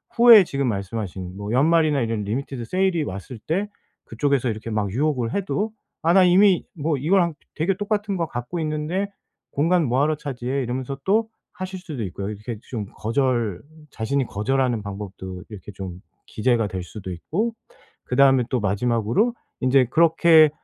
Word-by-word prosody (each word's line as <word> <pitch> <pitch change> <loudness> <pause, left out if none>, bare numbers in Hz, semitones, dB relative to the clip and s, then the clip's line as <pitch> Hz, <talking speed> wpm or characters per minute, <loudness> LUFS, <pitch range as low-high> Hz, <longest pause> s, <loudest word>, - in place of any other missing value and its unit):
후에 230 -3 +9
지금 140 -5 -2
말씀하신 95 -3 -4
뭐 100 +1 -5
연말이나 150 +2 +3
이런 115 -2 -1
리미티드 120 +3 -4
세일이 185 +2 +1
왔을 105 +1 -7
때 180 - -1 0.4
그쪽에서 130 +2 0
이렇게 110 +1 -5
막 105 -3 -1
유혹을 130 -1 0
해도 200 +2 -1 0.3
'아 165 +1 +4
나 190 0 +7
이미 185 +1 +5
뭐 155 -1 -1
이거랑 170 +4 +2 0.2
되 155 - -1
되게 195 +1 +2
똑같은 205 0 -1
거 165 -2 -1
갖고 125 +6 -5
있는데 155 +5 -1 0.4
공간 165 +3 +2
뭐 130 +1 +1
하러 155 +2 +2
차지해.' 135 -1 -3
이러면서 130 +2 -4
또 220 +3 +2 0.2
하실 185 0 -6
수도 155 -10 -6
있고요. 100 +1 -4
이렇게 105 +2 -6
좀 110 -5 -3
거절 115 -4 0 0.3
자신이 130 +5 -1
거절하는 125 +2 0
방법도 95 -2 -7
이게 - - -14
이렇게 105 -1 -9
좀 90 -2 -7 0.3
기재가 115 -1 +1
될 95 -2 -5
수도 95 0 -8
있고 195 - -2 0.5
그다음에 135 0 +4
또 130 - 0
마지막으로 115 - +1 0.3
인제 130 0 +4
그렇게 165 -1 +6
130 Hz, 360 characters per minute, -23 LUFS, 110-165 Hz, 0.5 s, 후에